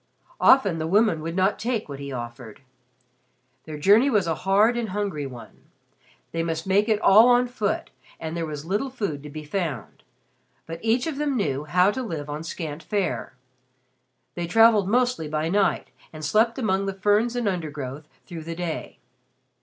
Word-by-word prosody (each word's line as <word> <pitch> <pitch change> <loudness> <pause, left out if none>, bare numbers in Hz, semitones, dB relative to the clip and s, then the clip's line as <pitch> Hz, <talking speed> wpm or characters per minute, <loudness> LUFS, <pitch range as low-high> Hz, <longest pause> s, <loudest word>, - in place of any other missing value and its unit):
Often 200 -11 +5
the 160 - -2
women 200 -3 +2
would 165 +2 -5
not 190 +2 +1
take 230 -2 -2
what 140 -2 -8
he 140 0 -6
offered. 120 -1 -8 1.0
Their 155 -1 -7
journey 210 - +5
was 210 -8 +2
a 165 - 0
hard 200 +8 +2
and 235 -2 -2
hungry 185 -8 -3
one. 125 -3 -12 0.7
They 165 - -2
must 165 -1 -3
make 200 +3 +2
it 215 -1 +2
all 220 +5 +7
on 245 0 +4
foot 225 -5 -2 0.3
and 160 0 -5
there 165 -1 -2
was 150 -1 -6
little 205 +10 -1
food 200 - -4
to 150 - -9
be 155 +1 -8
found. 150 - -4 0.6
But 165 0 -7
each 230 +3 +1
of 315 -4 -3
them 290 -3 -1
knew 145 - -1
how 180 +6 +3
to 260 - -4
live 155 - -5
on 150 +2 -5
scant 160 -2 -6
fare. 200 -9 -2 1.0
They 175 -1 -4
traveled 220 0 +5
mostly 245 -7 +1
by 155 +1 -2
night 200 +2 +1 0.2
and 155 -1 -7
slept 220 +8 +2
among 195 -5 0
the 195 - -3
ferns 210 +5 +2
and 240 -3 -1
undergrowth 150 -6 -4 0.2
through 165 -4 -8
the 165 0 -5
day. 170 -2 -5
185 Hz, 175 wpm, -24 LUFS, 155-215 Hz, 1.0 s, all